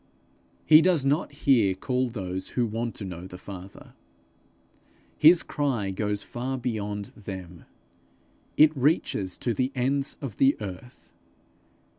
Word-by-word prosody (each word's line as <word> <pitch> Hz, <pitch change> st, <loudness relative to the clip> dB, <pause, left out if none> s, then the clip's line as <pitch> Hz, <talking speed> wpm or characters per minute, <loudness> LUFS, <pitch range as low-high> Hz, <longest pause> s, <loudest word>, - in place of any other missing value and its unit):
He 155 Hz, 0 st, +8 dB
does 170 Hz, -6 st, +2 dB
not 145 Hz, +4 st, +1 dB
here 125 Hz, -9 st, +3 dB
call 125 Hz, +6 st, -1 dB
those 95 Hz, -5 st, -5 dB
who 120 Hz, -, +3 dB
want 115 Hz, +1 st, -3 dB
to 100 Hz, -, -6 dB
know 90 Hz, -1 st, -7 dB
the 90 Hz, -, -10 dB
Father; 95 Hz, +1 st, -11 dB, 1.2 s
his 165 Hz, +3 st, +6 dB
cry 125 Hz, -10 st, -1 dB
goes 105 Hz, +1 st, -2 dB
far 130 Hz, +2 st, -4 dB
beyond 105 Hz, -5 st, -4 dB
them; 95 Hz, -4 st, -9 dB, 0.9 s
it 155 Hz, 0 st, +6 dB
reaches 130 Hz, -, 0 dB
to 120 Hz, -, -1 dB
the 130 Hz, +3 st, -1 dB
ends 135 Hz, +2 st, 0 dB
of 135 Hz, -8 st, -7 dB
the 135 Hz, +1 st, +4 dB
earth. 105 Hz, +4 st, -9 dB
120 Hz, 130 wpm, -26 LUFS, 95-135 Hz, 1.2 s, He